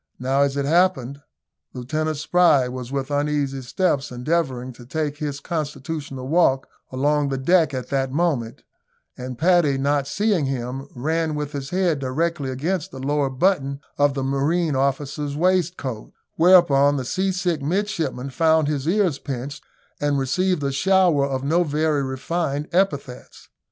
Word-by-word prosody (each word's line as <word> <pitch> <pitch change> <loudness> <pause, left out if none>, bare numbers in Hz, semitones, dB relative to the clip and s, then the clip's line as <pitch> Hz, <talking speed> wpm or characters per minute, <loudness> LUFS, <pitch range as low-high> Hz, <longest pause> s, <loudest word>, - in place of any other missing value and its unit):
Now, 135 +2 +1
as 140 0 +1
it 140 - 0
happened, 145 -5 +1 0.5
Lieutenant 155 +5 -2
Spry 150 -4 +3
was 125 0 -6
with 140 0 -3
uneasy 145 -2 -1
steps 140 +1 -1
endeavouring 130 -1 -2
to 120 - -14
take 150 +3 -3
his 145 -2 -4
constitutional 145 -4 -5
walk 140 -4 +2 0.2
along 145 +2 +1
the 135 - -2
deck 165 +4 +3
at 130 - -5
that 135 -1 0
moment, 140 -7 -1 0.5
and 125 -1 -7
Paddy, 165 -3 +3
not 140 0 0
seeing 200 -5 +1
him, 135 +1 -4
ran 160 +4 -1
with 150 -1 -3
his 140 -2 -5
head 180 -5 +1
directly 140 +2 -1
against 160 +7 -2
the 150 - -10
lower 140 +1 0
button 140 -1 0 0.2
of 145 -1 +3
the 135 - -2
marine 145 +4 0
officer's 140 +2 -1
waistcoat, 170 -9 -1 0.2
whereon 155 -5 +5
the 130 - -3
seasick 185 0 -1
midshipman 165 -5 -2
found 160 +1 +3
his 145 -1 -2
ears 180 -5 +1
pinched, 135 +1 -6 0.4
and 145 -1 +1
received 160 +5 0
a 140 - 0
shower 175 -2 +3
of 135 -1 -3
no 165 +5 +2
very 150 -1 0
refined 140 +2 -2
epithets. 145 -9 -2
145 Hz, 145 wpm, -22 LUFS, 135-165 Hz, 0.5 s, whereon